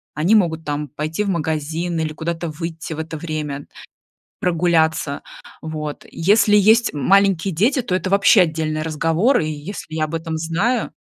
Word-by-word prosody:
они 165 +8 +2
могут 165 -6 +2
там 145 0 -3
пойти 155 +7 -3
в 200 - -2
магазин 160 0 -2
или 155 -1 -1
куда-то 165 +2 -4
выйти 160 0 -6
в - - -8
это 160 0 -5
время, 150 -3 -5 0.7
прогуляться, 160 -4 +1 0.4
вот. 155 -2 -5
Если 205 +4 +3
есть 220 +3 +4
м 145 - -5
маленькие 195 -2 +3
дети, 245 - +2
то 210 -6 -2
это 185 +1 -1
вообще 200 +1 +5
отдельный 155 -2 -1
разговор. 165 - +1
И 155 - -2
если 155 +2 -7
я 155 -1 0
об 165 +2 -4
этом 160 -1 -4
знаю, 190 +9 -1
165 Hz, 165 wpm, -20 LUFS, 155-190 Hz, 0.7 s, вообще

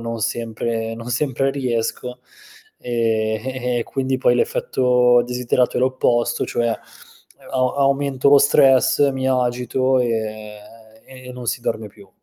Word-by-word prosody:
non 115 0 -5
sempre 115 0 -3
non 115 +1 -9
sempre 135 +2 0
riesco, 125 -1 -3 0.6
e 110 -2 -1
e 130 - -3 0.2
e 120 - +1
e - - -1
quindi 130 +2 -2
poi 130 - +2
l'effetto 125 - +2
desiderato 125 0 0
è - - 0
l'opposto, 120 -2 +1
cioè 120 0 -1
a 115 - -3 0.7
a 130 +2 0
aumento 140 -1 +1
lo 145 - +7
stress, 140 0 +4
mi 130 0 -2
agito 125 +1 0
e 110 -3 -3 0.5
e 130 -1 -12
non 125 -1 -9
si 120 - -2
dorme 110 -2 -3
più. 100 0 -18
125 Hz, 140 wpm, -20 LUFS, 115-130 Hz, 0.7 s, lo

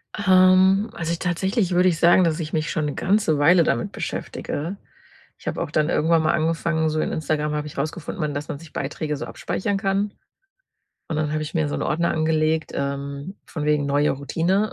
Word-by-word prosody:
Ähm, 190 +1 +5
also, 170 0 -2
tatsächlich 190 +2 0
würde 180 +1 +4
ich 165 -1 -2
sagen, 175 +2 +6
dass 165 0 +1
ich 155 -1 -5
mich 155 -1 0
schon 155 -2 -1
'ne 145 - -3
ganze 190 -6 +2
Weile 170 +4 +6
damit 120 - 0
beschäftige. 165 +7 -4 0.6
Ich - - -16
habe - - -2
auch - - -3
dann 155 +1 +1
irgendwann 160 +1 +2
mal 155 - +2
angefangen 160 0 0
so 155 0 -1
in - - -1
Instagram 150 -1 -1
habe 150 0 -2
ich - - -11
rausgefunden, 155 +7 -4
man 150 -1 -1
dass 145 +1 -4
man 140 - -4
sich 165 -2 -14
Beiträge 150 +2 -3
so - - -5
abspeichern 200 +1 -2
kann, 195 +1 0 1.0
und 155 - -1
dann 150 -1 -1
habe 155 0 -1
ich 155 - -6
mir 155 -2 +1
so - - -3
'n - - -3
Ordner 170 +2 0
angelegt, 155 0 +1
ähm, 140 +5 -4
von 155 -3 -5
wegen 150 -1 +2
neue 145 +1 +2
Routine, 175 +9 0
160 Hz, 205 wpm, -23 LUFS, 150-185 Hz, 1.0 s, sagen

